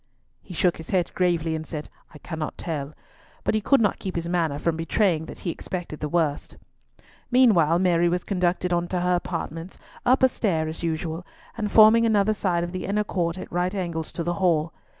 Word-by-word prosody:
He 180 - -10
shook 175 +1 +2
his 160 - -10
head 180 -3 +1
gravely 170 -3 +1
and 160 0 -3
said, 150 -2 -5 0.2
"I - - -12
cannot 160 0 -5
tell," 150 -3 -4 0.5
but - - +1
he 215 - +1
could 275 +6 +4
not 210 -3 +1
keep 190 - -5
his 170 0 -2
manner 165 -4 0
from 165 +2 0
betraying 165 0 +1
that - - -9
he 170 - +1
expected 175 -3 -6
the 150 - -3
worst. 155 -3 -1 0.7
Meanwhile 205 -11 +5
Mary 175 -1 +3
was 180 +1 -1
conducted 180 -1 0
on 175 0 0
to 180 0 -2
her 180 0 +2
apartments, 170 0 -4 0.3
up 255 +2 +3
a - - +9
stair 175 -10 -1
as 160 - -6
usual, 165 0 -3 0.3
and 210 -3 -3
forming 225 +1 +7
another 215 -1 +3
side 180 -4 0
of 175 - -4
the 185 0 -4
inner 210 +2 +1
court 175 -4 -2
at - - -8
right 180 +3 -1
angles 170 -4 -3
to 170 - -3
the 175 +1 -1
Hall. 165 -3 +2
175 Hz, 205 wpm, -25 LUFS, 165-190 Hz, 0.7 s, a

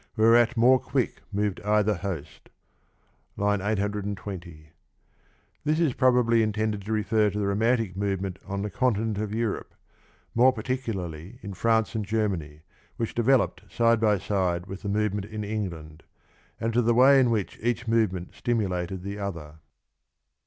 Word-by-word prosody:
Whereat 115 +2 +4
more 125 +3 +6
quick - - -2
Moved 100 -1 -1
either 105 0 +2
host. 85 -5 -6 0.9
(III. 105 -1 +1
820) 100 -5 -4 0.9
This 155 +2 +1
is 160 -7 +2
probably 120 -3 +3
intended 110 -1 -1
to 110 - -4
refer 105 0 +2
to 105 - -5
the 105 - 0
romantic 110 0 +1
move 100 -1 -1
ment 95 -1 -5
on 100 0 -3
the 105 - -4
continent 110 -4 0
of 105 -1 -3
Europe, 115 -1 -3 0.6
more 125 +3 +5
particularly 110 -7 -4
in 100 - -6
France 110 +3 +1
and 110 -2 -2
Germany, 95 -9 -2 0.4
which 115 - -2
developed 120 -5 +2
side 115 -1 +3
by 105 -2 +3
side 90 -2 -1
with 95 0 -8
the 105 - -4
movement 105 -1 0
in 105 0 -6
England, 85 -7 -5 0.6
and 115 0 -1
to 120 - +3
the 120 0 +2
way 135 +3 +7
in 125 -2 +4
which 110 -5 -2
ea(h 120 +1 -1
movement 105 -6 0
stimulated 95 -6 -2
the 100 +1 -5
other. 85 -6 -6
105 Hz, 150 wpm, -26 LUFS, 95-115 Hz, 0.9 s, way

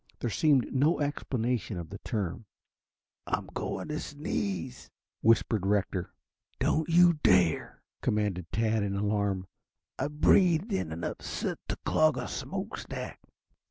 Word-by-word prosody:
There 120 - -2
seemed 140 -3 +3
no 145 +6 +3
explanation 125 -7 -1
of 85 0 -7
the 100 - -7
term. 105 -2 -3 0.8
"I'm - - -1
going - - -3
to 150 - -2
sneeze," 145 - -4 0.3
whispered 110 -2 +3
Rector. 95 -2 0 0.5
"Don't 160 +1 +1
you 170 -1 +6
dare," 90 -3 +3 0.2
commanded 100 -5 -1
Tad 110 -1 +1
in 100 -1 -1
alarm. 100 -2 0 0.5
"I've 150 +1 -3
breathed 180 +4 +4
in 135 - -1
enough 80 +1 -4
soot - - -3
to - - -2
clog 155 -3 +3
a 125 - -3
smoke - - -4
stack." - - -6
115 Hz, 130 wpm, -29 LUFS, 100-150 Hz, 0.8 s, you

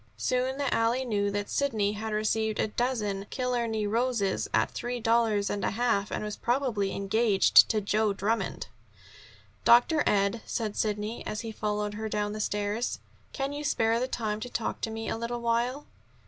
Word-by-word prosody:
Soon 255 +1 0
the 280 -2 0
alley 235 +3 +1
knew 205 -4 0
that 205 0 -2
Sidney 220 -8 0
had 215 +1 -4
received 215 0 0
a - - +2
dozen 210 -5 -1
Killarney 235 -4 -1
roses 225 -2 0
at - - +2
three 245 0 -4
dollars 225 -3 +2
and 205 - -2
a - - +2
half, 220 -2 0
and - - -3
was 210 -1 -4
probably 240 -6 0
engaged 200 +1 +4
to 215 -2 +1
Joe 210 +1 +1
Drummond. 200 +1 -1 1.0
"Dr. 270 +6 +5
Ed," 200 +2 +2
said 215 -3 -2
Sidney, 210 +1 -2
as 215 - -3
he 225 - -5
followed 210 -1 -2
her 220 +1 -4
down 210 0 -1
the 215 - -5
stairs, 210 +3 -1 0.3
"can 275 0 -3
you 290 +1 -5
spare 230 -5 +2
the 255 - -1
time 215 -4 -2
to 245 - -6
talk 230 - -3
to - - -1
me 225 0 -5
a - - -1
little 235 +1 -3
while?" 240 +4 0
220 Hz, 175 wpm, -28 LUFS, 210-240 Hz, 1.0 s, Dr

